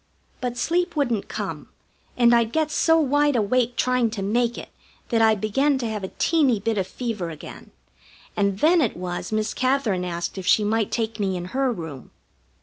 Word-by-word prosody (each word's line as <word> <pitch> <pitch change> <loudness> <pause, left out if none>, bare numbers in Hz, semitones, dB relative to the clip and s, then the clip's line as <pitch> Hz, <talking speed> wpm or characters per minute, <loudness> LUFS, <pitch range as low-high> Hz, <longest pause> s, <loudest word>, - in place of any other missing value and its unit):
But 245 -1 -3
sleep 345 +7 0
wouldn't 240 -8 0
come, - - -5 0.5
and 240 -1 +5
I'd 235 -1 +3
get 310 +1 0
so 325 +1 +3
wide 290 -1 +2
awake 240 +2 +1
trying 250 -1 +1
to 195 - -2
make 235 +4 0
it - - -8 0.4
that 230 -2 +2
I 220 -1 +5
began 270 +8 +1
to 245 -3 -3
have 215 -2 -4
a 190 - -5
teeny 285 -9 +2
bit 215 +1 -1
of 185 - -2
fever 215 -4 -4
again, 155 -2 -10 0.7
and 200 -2 +1
then 335 +2 +5
it 235 - 0
was 180 +2 -5
Miss 215 0 -1
Katherine 255 -8 0
asked 175 +1 -4
if 185 - -7
she 215 - +4
might 215 0 0
take 225 -1 -2
me 190 -2 0
in 175 - -5
her 265 -1 +1
room. 160 - -7
230 Hz, 190 wpm, -23 LUFS, 200-260 Hz, 0.7 s, and